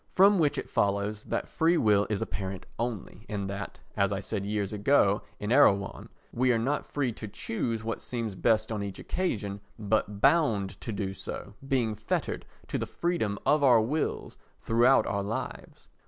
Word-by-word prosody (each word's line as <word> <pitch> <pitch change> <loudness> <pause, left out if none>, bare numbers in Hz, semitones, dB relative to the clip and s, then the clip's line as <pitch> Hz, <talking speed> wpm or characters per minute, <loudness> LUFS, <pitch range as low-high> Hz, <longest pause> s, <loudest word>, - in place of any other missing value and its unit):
From 195 +1 +6
which 150 -3 +2
it - - -3
follows 100 +1 0
that - - -2
free 170 +1 +2
will 105 -5 +3
is 105 -2 0
apparent 95 -2 -5
only, 115 -3 -4
and 100 -3 -2
that, 100 0 -6 0.2
as 100 -1 +2
I 100 - -1
said 100 0 -3
years 105 -1 -1
ago 105 -2 +3 0.2
in 105 +2 -3
Erewhon, 100 -7 +3 0.2
we 125 +1 +3
are 120 - +3
not 135 +6 -1
free 135 -4 -1
to 110 -1 -7
choose 115 +2 -3
what 115 0 -3
seems 115 -4 -3
best 110 +3 +1
on 105 -2 -2
each 100 -1 -5
occasion 105 - -2 0.2
but 105 -1 0
bound 135 - +2
to 115 - -4
do 100 -2 -3
so, 100 +1 -7
being 125 -5 +1
fettered 110 +1 -3 0.2
to - - -1
the - - -3
freedom 170 -13 -1
of 150 +1 +4
our 125 -4 +7
wills 140 +8 -2 0.2
throughout 120 +4 +4
our 100 - -1
lives. 105 +3 -5
110 Hz, 175 wpm, -29 LUFS, 100-125 Hz, 0.2 s, our